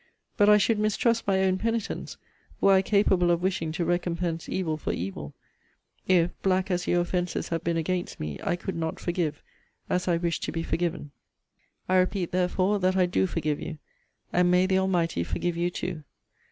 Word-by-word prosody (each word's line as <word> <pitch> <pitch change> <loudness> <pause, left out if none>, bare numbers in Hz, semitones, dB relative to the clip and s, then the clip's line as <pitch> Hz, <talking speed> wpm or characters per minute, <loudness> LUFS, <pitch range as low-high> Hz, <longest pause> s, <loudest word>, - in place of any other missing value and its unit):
But 205 0 +4
I 210 - +8
should 210 +1 +2
mistrust 220 +2 +1
my 190 -1 +3
own 190 0 +2
penitence, 230 0 -3 0.4
were 195 - +5
I 190 - +5
capable 190 -3 +3
of 170 0 +1
wishing 180 -4 -1
to 170 +1 -1
recompense 170 -1 -1
evil 170 -4 -1
for 155 - -3
evil 75 -6 -5 0.7
if, 180 -2 +4
black 190 0 +1
as 180 0 -1
your 175 - +3
offences 175 0 -2
have 165 -1 -2
been 170 -1 0
against 175 +2 -2
me, 75 -2 -5
I - - +1
could 185 +2 -5
not 160 -1 -3
forgive, 170 -4 -2 0.5
as 180 0 0
I 175 -2 +3
wish 170 -1 -1
to - - -4
be 165 0 -3
forgiven. 165 -4 -2 0.8
I 185 - +3
repeat, 185 -1 +1
therefore, 185 +3 +1
that 185 0 +1
I 185 - +4
do 180 +2 +1
forgive 155 -4 -2
you. 160 -2 -6 0.6
And 180 0 +4
may 180 +1 +4
the 190 0 +2
Almighty 175 - 0
forgive 175 - -2
you 175 +1 0
too! 175 -3 -5
180 Hz, 185 wpm, -27 LUFS, 165-190 Hz, 0.8 s, I